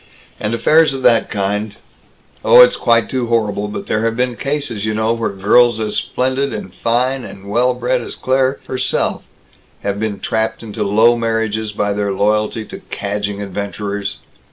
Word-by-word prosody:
And 105 +2 -1
affairs 155 +4 +4
of 135 -1 -5
that 115 - +4
kind 105 +1 -2 0.7
Oh, - - +8
it's - - +6
quite 115 -1 +2
too 130 -2 -2
horrible, 105 -3 0
but 105 - -6
there 110 - -1
have 115 0 0
been 125 -1 0
cases, 140 -7 -3
you 110 0 -1
know, 110 +1 +1
where 115 0 -1
girls 110 +4 +3
as 105 -1 -2
splendid 130 +4 -1
and 105 -4 -6
fine 125 +4 0
and 100 0 -10
well 120 +4 +2
bred 125 +1 0
as - - -6
Claire 130 +1 +1
herself 130 0 -1 0.6
have 100 0 -2
been 105 -2 -2
trapped 110 +3 -2
into 110 -1 -4
low 110 +4 +4
marriages 110 -2 -1
by 105 0 -1
their 100 0 -1
loyalty 105 +2 0
to - - -9
cadging 100 0 -3
adventurers!" 100 0 -4
110 Hz, 170 wpm, -17 LUFS, 105-125 Hz, 0.7 s, Oh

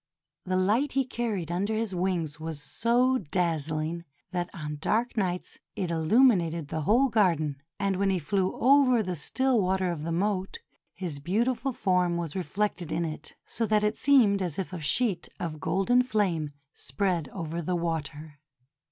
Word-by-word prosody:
The 185 0 -1
light 220 +10 +2
he 270 0 +2
carried 220 - -3
under 200 +5 -1
his 220 -3 -2
wings 175 -4 -1
was 160 -1 -5
so 240 - +2
dazzling 165 -1 -1 0.3
that 175 -1 -2
on 150 -4 -6
dark 230 +8 0
nights 180 -4 -2 0.2
it 180 -3 -2
illumined 170 - +3
the 160 - -2
whole 240 - +3
garden, 165 - +1 0.2
and 195 -1 0
when 200 0 +2
he 190 - +2
flew 185 +3 0
over 255 -3 +4
the 180 -2 -3
still 255 - +1
water 185 -1 +1
of 165 -3 -4
the 165 +2 -3
moat, 190 +2 -1 0.4
his 170 -7 -4
beautiful 235 - 0
form 180 -6 +1
was 165 -3 -4
reflected 185 -1 -2
in 170 - 0
it, 155 -1 -7
so 225 0 -1
that 210 -1 +2
it 210 +1 +1
seemed 230 -8 +4
as 175 -5 -2
if 190 -1 -4
a 175 - -5
sheet 180 - 0
of 155 -3 -4
golden 195 +10 +2
flame 200 - 0 0.2
spread 170 +2 -1
over 170 0 -4
the 180 +2 -1
water. 155 -3 -4
185 Hz, 165 wpm, -28 LUFS, 165-215 Hz, 0.4 s, over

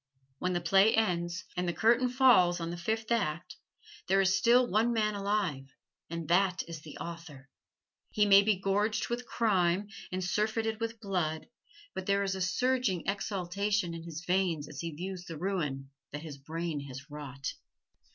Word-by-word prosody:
When 180 0 0
the 175 - 0
play 195 +5 +5
ends 180 -5 0
and 180 0 -1
the 175 - 0
curtain 235 +5 +3
falls 245 -10 +5
on 165 0 -3
the - - -4
fifth 220 +6 -3
act, 175 -8 -1 0.5
there 195 +1 +3
is 190 0 +4
still 240 +3 +5
one 225 +2 +2
man 215 -2 +1
alive, 200 -9 -1 0.4
and 165 -1 -5
that 185 +2 +2
is 165 -2 -7
the 150 -1 -10
author. 160 -6 -9 0.6
He 210 - +2
may 200 -1 +8
be 210 0 +2
gorged 205 +2 0
with 240 +1 -3
crime 195 -3 +1 0.2
and 185 0 -2
surfeited 220 +3 0
with 230 0 -3
blood, 175 -6 -2 0.4
but 190 0 -5
there 200 0 +2
is 195 -1 -1
a 190 - -4
surging 210 0 +1
exultation 200 -1 -1
in 165 - -6
his 165 +1 -8
veins 175 -5 +1
as 140 - -9
he 170 - -3
views 180 +3 -6
the 165 -4 -7
ruin 150 -7 -2 0.2
that 150 +2 -6
his 145 -4 -8
brain 160 +2 -4
has 135 +3 -9
wrought. 140 -2 -6
185 Hz, 170 wpm, -31 LUFS, 165-210 Hz, 0.6 s, may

